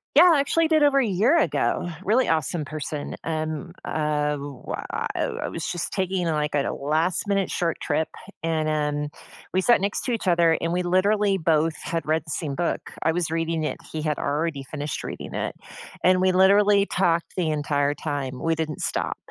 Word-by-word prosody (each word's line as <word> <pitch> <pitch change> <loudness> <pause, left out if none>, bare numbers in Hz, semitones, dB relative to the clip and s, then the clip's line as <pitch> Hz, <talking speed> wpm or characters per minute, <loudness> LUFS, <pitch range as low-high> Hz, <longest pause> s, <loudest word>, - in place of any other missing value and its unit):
Yeah, 320 - +9
I 280 - +4
actually 325 +3 +2
did 310 -1 +3
over 280 -1 +5
a 265 - +2
year 220 - +3
ago. 180 - +1 0.2
Really 230 +6 +3
awesome 160 0 0
person, 150 -1 -5
um, 155 +1 -3
ah, 150 -1 0
wha 140 -2 -6
ah - - -2
I - - -3
w - - -2
I - - -2
was 165 - -5
just 175 -2 -3
taking, 185 -2 0
like, 150 -2 0
a 145 -1 +1
last-minute 180 +7 0
short 170 -2 -1
trip, 155 +1 -1 0.3
and, 160 -1 0
um, 150 -1 0 0.5
we 185 - +3
sat 240 +5 +5
next 200 +1 -1
to 250 - -1
each 225 -4 -2
other, 170 -2 +4
and 165 +1 -1
we 180 +1 0
literally 200 +3 +2
both 160 -1 +1
had 165 -1 -3
read 155 0 +1
the - - -12
same 145 -2 -3
book. 175 +2 -2
I 165 - +2
was 170 -2 -1
reading 165 -1 -1
it, 150 - -2
he 155 - -4
had 150 -1 -1
already 145 0 -1
finished 145 +1 -4
reading - - -6
it, - - -3 0.5
and 185 +1 +5
we 185 0 +3
literally 200 +2 +5
talked 170 -2 +1
the 175 -3 +1
entire 145 -1 +1
time, 140 -4 -4
we 165 - +1
didn't 155 -2 -3
stop. - - -1
165 Hz, 195 wpm, -24 LUFS, 150-185 Hz, 0.5 s, Yeah